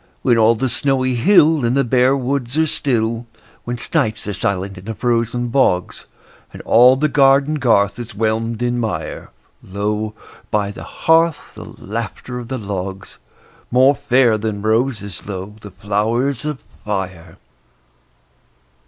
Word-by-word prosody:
When 125 -3 +4
all 115 0 +4
the 130 +4 -1
snowy 130 0 0
hill 155 - +4
And 120 +3 +1
the 140 - +3
bare 130 +2 +3
woods 135 0 -2
are 160 - +4
still; 115 -5 -1 0.4
When 120 0 -3
snipes 110 -1 -1
are 105 - -2
silent 95 +1 -3
in 90 - -15
the 110 0 -5
frozen 120 0 -1
bogs, 115 -8 0 0.5
And - - -11
all 125 +3 +6
the 150 +3 +1
garden 140 +1 +3
garth 100 -5 +2
is 120 -4 -8
whelmed 115 +2 -1
in 120 0 0
mire, 100 -9 -4 0.3
Lo, 105 +2 -3 0.3
by 100 -1 0
the 105 - -10 0.2
hearth, 165 -1 +2
the - - -10
laughter 115 +3 -5
of 120 - -8
the 130 - -4
logs— 95 -3 -6 0.5
More 130 +3 +5
fair 130 -5 +2
than 105 -1 -3
roses, 110 -3 -1
lo, 95 0 -6
the 105 - -9
flowers 115 +7 -1
of 150 -3 -4 0.2
fire! 95 -5 -5
115 Hz, 145 wpm, -18 LUFS, 105-130 Hz, 0.5 s, all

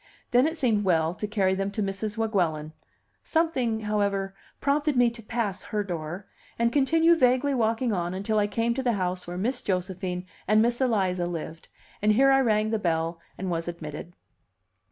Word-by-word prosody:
Then 250 +4 +5
it 320 +1 -3
seemed 225 -7 +2
well 165 -3 +2
to 210 - -4
carry 195 -3 +1
them 195 +1 -1
to 210 - -1
Mrs. 200 +2 -3
Weguelin. 170 -9 0 0.5
Something, 260 -9 0
however, 200 -2 -1 0.3
prompted 290 0 +1
me 245 -1 +4
to 235 0 -10
pass 210 -4 -2
her 210 -1 -2
door, 175 0 -5 0.3
and 235 0 +1
continue 325 +4 +4
vaguely 260 -1 +3
walking 230 -1 +1
on 175 -1 -2
until 210 +3 0
I 205 - +2
came 230 +3 0
to 265 - -2
the 245 -2 +1
house 180 -2 -2
where 175 0 -5
Miss 245 +7 -1
Josephine 180 -1 -3 0.2
and 215 +2 +4
Miss 235 +3 +2
Eliza 190 -8 +1
lived; 165 -1 -6 0.3
and 210 +1 +4
here 270 +5 +5
I 270 0 +5
rang 215 -3 +2
the 220 - 0
bell 165 -2 -1 0.2
and 185 -1 -3
was 165 0 -2
admitted. 165 0 -7
210 Hz, 180 wpm, -26 LUFS, 180-240 Hz, 0.5 s, Then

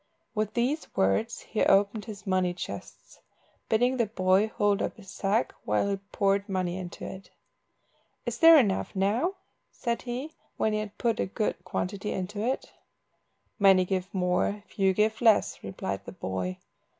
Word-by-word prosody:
With 215 -1 -2
these 260 +7 0
words 95 - +1
he 220 - -3
opened 200 +2 +3
his 210 -2 -9
money 185 -2 +1
chests, - - -8 0.5
bidding 245 +4 +3
the 235 -3 +2
boy 190 0 +3
hold 205 -2 +1
up - - -2
his 195 -4 -12
sack 210 +4 0
while 105 - +1
he 200 - 0
poured 200 +1 0
money 185 -2 -1
into 180 -2 -6
it. 190 +1 -8 1.0
"Is - - -3
there 330 0 +9
enough 205 -6 +1
now?" 220 - +1 0.4
said 235 -1 -2
he, 255 +6 -5 0.2
when 220 - +1
he 215 - +1
had 215 -1 -6
put 235 -2 0
a - - 0
good 205 -2 -2
quantity 195 +3 -3
into 200 +3 -3
it. 255 +3 -2 0.9
"Many 190 -2 +6
give 185 0 -2
more, 185 +2 0
few 195 -1 +1
give 215 +3 +1
less," 225 -3 +4
replied 95 0 -4
the 95 - -8
boy. 95 -1 -3
200 Hz, 160 wpm, -28 LUFS, 185-220 Hz, 1.0 s, there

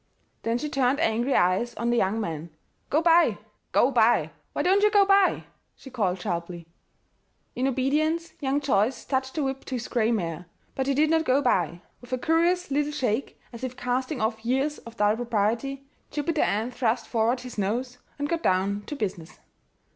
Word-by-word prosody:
Then 230 +1 0
she 300 - -3
turned 275 -1 +1
angry 240 -1 +1
eyes 185 +7 +2
on 235 +2 -1
the 240 - +2
young 200 +1 +1
man. 165 -5 -4 0.4
"Go 310 +3 +2
by 335 0 +5 0.3
go - - +4
by! - - +3 0.2
Why - - -2
don't 385 +3 +4
you 420 - +5
go 410 -1 +5
by?" 390 -1 +4 0.3
she 265 - -13
called 190 -7 0
sharply. 175 -2 -4 0.9
In 255 +2 0
obedience, 305 +6 0
young 280 0 0
Joyce 240 -2 +1
touched 265 -1 -2
the 305 - 0
whip 270 0 -3
to 260 - -4
his 240 -1 -4
gray 230 -1 +1
mare: 170 -5 -2 0.3
but 265 0 -2
he 275 - +1
did 305 +2 +3
not 325 0 +3
go 265 -2 +3
by. 175 - 0 0.2
With 245 - -14
a 255 - +1
curious 340 +5 +1
little 295 +1 +1
shake, 255 -3 -2
as 235 - -9
if 255 -1 -4
casting 255 +3 -2
off 220 0 -1
years 265 +5 0
of 230 0 -13
dull 210 +1 +3
propriety, 240 +4 -1 0.2
Jupiter 300 +1 -1
Ann 220 +5 0
thrust 245 -1 0
forward 235 +2 0
his 250 -4 -7
nose 245 +5 -2 0.2
and 290 0 -2
got 335 +1 -1
down 195 - +1
to 295 - -4
business. 180 - -5
250 Hz, 185 wpm, -26 LUFS, 220-290 Hz, 0.9 s, by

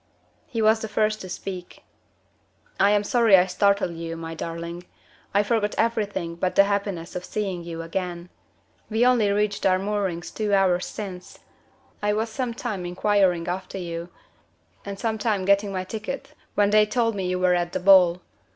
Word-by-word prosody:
He 225 -3 -2
was 220 +1 +4
the 220 - -4
first 215 0 0
to 185 - -8
speak. 180 0 -7 1.0
"I 200 - +5
am 205 0 +3
sorry 225 -2 +5
I 180 - +4
startled 200 0 +1
you, 165 0 -6
my 165 0 -6
darling. 170 +2 -6 0.5
I 205 +1 +3
forgot 210 -1 0
everything 205 -7 -1
but 180 +1 -1
the 200 - +7
happiness 200 -4 -2
of 180 - -4
seeing 190 -4 -3
you 165 -1 -6
again. 175 0 -4 0.6
We 225 +2 +2
only 240 -5 +4
reached 205 0 0
our 185 -1 +4
moorings 195 -3 -2
two 210 -2 0
hours 185 -2 +2
since. 185 -4 -8 0.6
I 210 0 +1
was 220 +2 -1
some 240 0 -3
time 215 -7 -4
inquiring 180 -1 +1
after 185 +2 -4
you, 170 -1 -5 0.7
and 200 -1 -6
some 220 0 -2
time 205 -3 0
getting 200 +1 +3
my 185 -1 -2
ticket 220 +7 -6 0.2
when 205 0 +3
they 210 0 +5
told 230 0 +1
me 190 -3 -3
you 180 - 0
were 180 0 +3
at 175 -1 0
the - - -2
ball. 180 -2 +6
195 Hz, 175 wpm, -24 LUFS, 180-210 Hz, 1.0 s, the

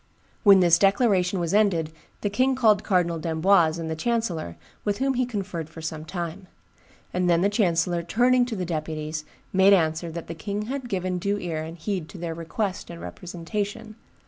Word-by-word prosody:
"When 200 -3 +7
this 170 -1 +5
declaration 195 -3 +3
was 170 +1 -1
ended, 185 -7 +2 0.3
the 205 - 0
king 260 +5 +2
called 220 -5 +4
Cardinal 175 -3 +1
d'Amboise 165 0 +3
and 165 -1 -4
the 160 - -2
chancellor, 175 - -2 0.3
with 205 -1 0
whom 270 +1 +1
he 255 -1 0
conferred 190 -8 -4
for 160 - -11
some 160 -1 -5
time; 175 +2 -5 0.7
and 180 0 +1
then 170 0 +4
the 200 - +4
chancellor, 175 -5 +1
turning 245 +8 +3
to 235 - -4
the 185 -3 -3
deputies, 155 -1 -4 0.3
made 190 +1 +6
answer 165 -2 +1
that 165 +1 -6
the 165 - -6
king 205 +5 -4
had 260 +2 -5
given 185 -3 -1
due 200 +3 0
ear 165 -5 -3
and 160 +2 -7
heed 175 -1 -3
to 195 - -10
their 170 -1 -4
request 185 +4 -3
and 170 -1 -8
representation 205 +7 -5
180 Hz, 185 wpm, -25 LUFS, 165-205 Hz, 0.7 s, When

